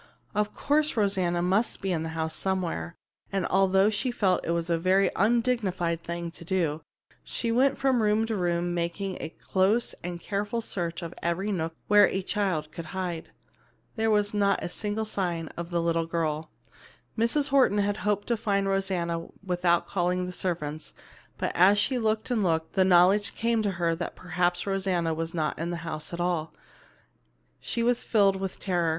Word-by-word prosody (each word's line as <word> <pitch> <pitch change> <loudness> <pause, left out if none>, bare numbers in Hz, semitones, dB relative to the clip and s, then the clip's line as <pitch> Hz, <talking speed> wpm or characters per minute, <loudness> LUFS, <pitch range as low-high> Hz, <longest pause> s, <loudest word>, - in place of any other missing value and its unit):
Of 210 0 0
course 300 -1 +1
Rosanna 185 -4 +1
must 195 +6 +1
be 195 - -2
in 165 -3 0
the 160 - -3
house 160 0 -2
somewhere, 175 - -2 0.4
and 195 -2 0
although 195 +2 +3
she 220 +5 -1
felt 195 -6 +1
it - - -5
was 170 0 0
a 170 -1 +1
very 185 +2 +3
undignified 205 -6 +1
thing 170 0 -4
to 170 - -11
do, 165 -4 0 0.4
she 230 - -2
went 265 +3 +3
from 260 -3 +2
room 215 +1 +2
to 225 -1 -2
room 175 -2 0
making 175 +3 -2
a 160 - -4
close 195 +7 0
and 175 0 -4
careful 205 +5 -2
search 175 -6 -3
of 165 0 -6
every 185 +5 -1
nook 165 -3 -2
where 205 -1 +7
a 190 - -2
child 180 -7 -1
could 170 - -7
hide. 175 -3 -3 0.7
There 225 -1 +1
was 210 -1 +2
not 200 -1 +2
a - - -3
single 210 +4 -3
sign 175 -6 -2
of 170 0 -7
the 175 -1 0
little 165 -1 +1
girl. 160 -2 -2 0.7
Mrs. 245 +6 +1
Horton 265 -7 +4
had 205 0 +1
hoped 205 -1 0
to 235 - +2
find 200 -3 0
Rosanna 180 -4 -1 0.2
without 175 -2 +1
calling 180 -1 0
the 180 - -5
servants, 155 -4 -3 0.4
but - - -1
as 195 +4 +5
she 250 +5 +1
looked 220 +1 0
and 235 -3 +2
looked, 160 -2 +1
and - - -36
the 190 - +3
knowledge 190 +3 +5
came 230 -1 +1
to 205 -2 0
her 170 -1 0
that 175 - -4
perhaps 175 0 -1
Rosanna 190 -4 0
was 165 +1 -4
not 155 -2 -1
in 165 +1 -2
the 175 - -3
house 155 -2 -5
at 170 - -5
all, 175 -3 -1 1.0
she 235 - -2
was 245 0 +2
filled 200 -3 +3
with 190 -1 -5
terror. 175 -4 0
185 Hz, 185 wpm, -27 LUFS, 170-210 Hz, 1.0 s, where